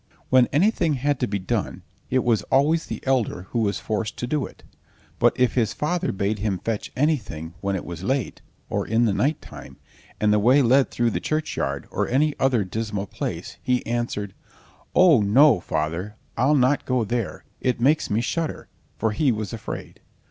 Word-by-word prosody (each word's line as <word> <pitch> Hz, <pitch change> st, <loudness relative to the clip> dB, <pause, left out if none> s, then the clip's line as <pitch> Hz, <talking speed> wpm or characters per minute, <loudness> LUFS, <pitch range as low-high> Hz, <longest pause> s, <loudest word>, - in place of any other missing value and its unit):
When 130 Hz, -2 st, +5 dB
anything 170 Hz, -1 st, +2 dB
had 140 Hz, +1 st, 0 dB
to 125 Hz, -, 0 dB
be 100 Hz, -, -1 dB
done, 95 Hz, -2 st, -3 dB, 0.3 s
it 130 Hz, 0 st, +2 dB
was 115 Hz, -3 st, +2 dB
always 150 Hz, +5 st, +3 dB
the -, -, -6 dB
elder 125 Hz, -9 st, 0 dB
who 120 Hz, -, 0 dB
was 100 Hz, -3 st, 0 dB
forced 110 Hz, 0 st, -3 dB
to -, -, -3 dB
do 140 Hz, +2 st, -1 dB
it; -, -, -18 dB, 0.6 s
but -, -, +3 dB
if 125 Hz, -2 st, +3 dB
his 115 Hz, -5 st, +1 dB
father 175 Hz, +4 st, -1 dB
bade 100 Hz, +2 st, -1 dB
him 100 Hz, -2 st, -1 dB
fetch 110 Hz, +2 st, -4 dB
anything 105 Hz, -, -1 dB
when 100 Hz, 0 st, -1 dB
it 90 Hz, -, -4 dB
was 85 Hz, -1 st, -7 dB
late, 130 Hz, +4 st, -2 dB, 0.3 s
or -, -, -2 dB
in 115 Hz, +2 st, +2 dB
the 105 Hz, -, +2 dB
night 145 Hz, +9 st, 0 dB
time, -, -, -11 dB, 0.4 s
and 105 Hz, 0 st, +3 dB
the 105 Hz, -, +4 dB
way 130 Hz, +7 st, +5 dB
led 130 Hz, +3 st, +4 dB
through 120 Hz, -1 st, 0 dB
the -, -, -1 dB
churchyard, 155 Hz, 0 st, -2 dB
or -, -, -1 dB
any 150 Hz, +4 st, +2 dB
other 130 Hz, -5 st, +2 dB
dismal 105 Hz, +1 st, -3 dB
place, -, -, -5 dB
he 125 Hz, -1 st, 0 dB
answered: 115 Hz, -4 st, -2 dB, 0.6 s
"Oh, 175 Hz, -10 st, +6 dB
no, 120 Hz, +4 st, +5 dB
father, 85 Hz, +6 st, -3 dB, 0.2 s
I'll 135 Hz, +6 st, +3 dB
not 135 Hz, +1 st, +2 dB
go 125 Hz, -2 st, +1 dB
there, 115 Hz, -1 st, -3 dB, 0.2 s
it 125 Hz, -2 st, 0 dB
makes 145 Hz, +6 st, +2 dB
me 105 Hz, +3 st, +1 dB
shudder!" 160 Hz, +6 st, -3 dB, 0.3 s
for 110 Hz, 0 st, 0 dB
he 130 Hz, +5 st, +2 dB
was 110 Hz, -4 st, -4 dB
afraid. -, -, -7 dB
120 Hz, 185 wpm, -24 LUFS, 105-140 Hz, 0.6 s, Oh